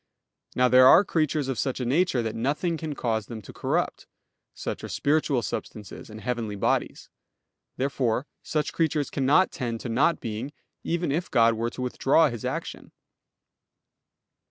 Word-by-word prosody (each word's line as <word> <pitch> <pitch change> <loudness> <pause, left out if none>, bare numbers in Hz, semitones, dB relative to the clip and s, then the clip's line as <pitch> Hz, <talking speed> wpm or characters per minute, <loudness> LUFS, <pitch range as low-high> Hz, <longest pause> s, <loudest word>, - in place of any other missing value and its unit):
Now 125 0 +4
there 130 +1 +7
are 180 +9 +7
creatures 155 -4 0
of 135 -4 -2
such 135 -2 -1
a 125 - -2
nature 135 -1 +2
that 110 -1 -3
nothing 150 +8 -1
can 155 -2 -5
cause 110 -5 -2
them 115 -2 -7
to - - -11
corrupt; - - -2 0.4
such - - -6
are - - -6
spiritual 145 -4 +1
substances 105 0 -6
and 110 0 -10
heavenly 120 -4 -3
bodies. 100 - -1 0.7
Therefore 130 -2 0 0.2
such 150 -1 -2
creatures 155 -3 0
cannot 145 +7 +3
tend 120 -4 -4
to 125 - -5
not 140 +9 +2
being, 115 +5 -5 0.3
even 170 -3 -1
if 165 +5 -2
God 115 -2 +4
were 115 +1 -2
to 125 - -6
withdraw 140 +5 +3
His 120 -3 -7
action. - - -5
130 Hz, 155 wpm, -26 LUFS, 115-150 Hz, 0.7 s, there